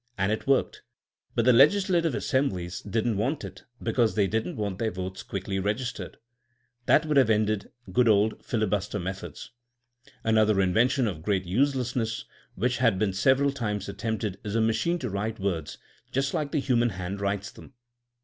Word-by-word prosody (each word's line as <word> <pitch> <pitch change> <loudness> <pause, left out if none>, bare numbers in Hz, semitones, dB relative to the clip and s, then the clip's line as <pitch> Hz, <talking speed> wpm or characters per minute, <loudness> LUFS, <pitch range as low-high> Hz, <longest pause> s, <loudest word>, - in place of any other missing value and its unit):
And 100 +1 +1
it 110 - -3
worked. 135 -1 +1 0.5
But 115 - +2
the 125 - +6
legislative 170 +2 +4
assemblies 95 -11 -1
didn't 110 +1 -1
want 130 +9 -1
it, - - -9 0.2
because 115 -1 +1
they 105 -2 +3
didn't 110 - -2
want 100 -4 -3
their 115 - +1
votes 95 -1 -5
quickly 95 0 -4
registered. 110 +6 -3 0.7
That 155 - +5
would 150 -2 +1
have 130 -5 +5
ended 110 -1 +1 0.2
good 120 +5 +3
old 105 0 +3
filibuster 105 -2 -1
methods. 95 +1 -6 0.7
Another 110 -2 +3
invention 120 +8 +3
of 90 -8 -3
great 95 +1 0
uselessness 125 +1 0 0.3
which 125 +5 0
has 115 -5 +3
been 95 0 0
several 135 +7 +3
times 105 -7 -3
attempted 105 -1 -3
is 105 -1 -4
a - - +3
machine 115 +11 +1
to 125 -8 -4
write 105 +3 -3
words 85 -6 -2 0.3
just 135 +1 0
like 145 -2 -1
the 150 - +1
human 120 -3 +2
hand 95 0 -5
writes 100 0 -2
them. 135 - -15
110 Hz, 165 wpm, -27 LUFS, 100-125 Hz, 0.7 s, the